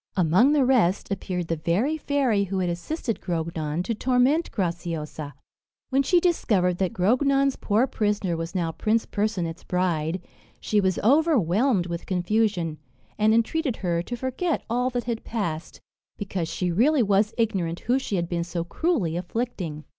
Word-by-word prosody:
Among 185 - +4
the 285 -3 +3
rest, 215 -8 +2
appeared 180 -3 -3
the 165 - -1
very 195 - 0
fairy 270 -9 +1
who 195 0 -3
had 180 -2 0
assisted 230 - -4
Grognon 165 -2 -2
to 230 - -2
torment 255 +8 +2
Graciosa. 165 -5 -4 0.6
When 270 +1 +4
she 350 +6 +3
discovered 200 - +1
that 190 -2 +1
Grognon's 275 +7 +2
poor 220 +4 +1
prisoner 205 -7 -1
was 165 +3 -5
now 170 -3 0
Prince 220 +6 0
Percinet's 185 -6 -2
bride, 180 -2 -1 0.4
she 210 -1 +1
was 190 -2 +1
overwhelmed 240 - +3
with 170 -1 -5
confusion, 180 -3 0 0.4
and 215 +1 +4
entreated 245 +4 +1
her 170 -1 +1
to 240 +8 -5
forget 265 +6 -2
all 250 +2 +1
that 245 -1 -2
had 235 -2 -3
passed, 170 -8 -4 0.4
because 190 -4 -3
she 180 -1 -1
really 255 - +3
was 205 +1 +2
ignorant 190 -7 -1
who 250 +3 +1
she 215 - -3
had 170 -2 -1
been 170 -1 -1
so 170 0 -3
cruelly 190 - 0
afflicting. 180 -4 -4
200 Hz, 155 wpm, -25 LUFS, 170-245 Hz, 0.6 s, Among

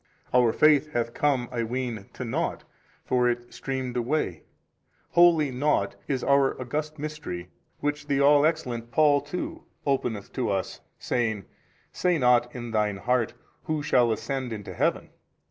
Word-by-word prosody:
Our 125 -2 +5
faith 150 +2 +4
hath 115 0 -1
come 135 -4 +1
I 120 -2 -2
ween 120 -3 -3
to 125 - -5
nought, 115 - -2 0.4
for 125 -1 +2
it 120 0 -4
streamed 130 -2 -4
away; 120 - -1 0.7
wholly 165 -5 +5
nought 145 +4 +1
is 135 -3 -1
pur 140 -1 +3
august 150 +5 -3
mystery, 145 - -6 0.3
which 145 0 -2
the 140 -2 +1
all 145 +1 +6
excellent 125 -8 -1
Paul 145 +1 +4
too 160 +5 -5 0.2
openeth 125 -7 -1
to 125 -4 -1
us 95 -2 -2 0.2
saying, 110 -5 -1 0.5
Say 180 -2 +1
not 125 -2 +3
in 120 -1 -6
thine 105 -2 +1
heart, 120 +2 0 0.3
who 155 -2 -1
shall 120 -4 +3
ascend 130 +2 -3
into 105 -3 -6
heaven? - - 0
125 Hz, 145 wpm, -26 LUFS, 120-145 Hz, 0.7 s, all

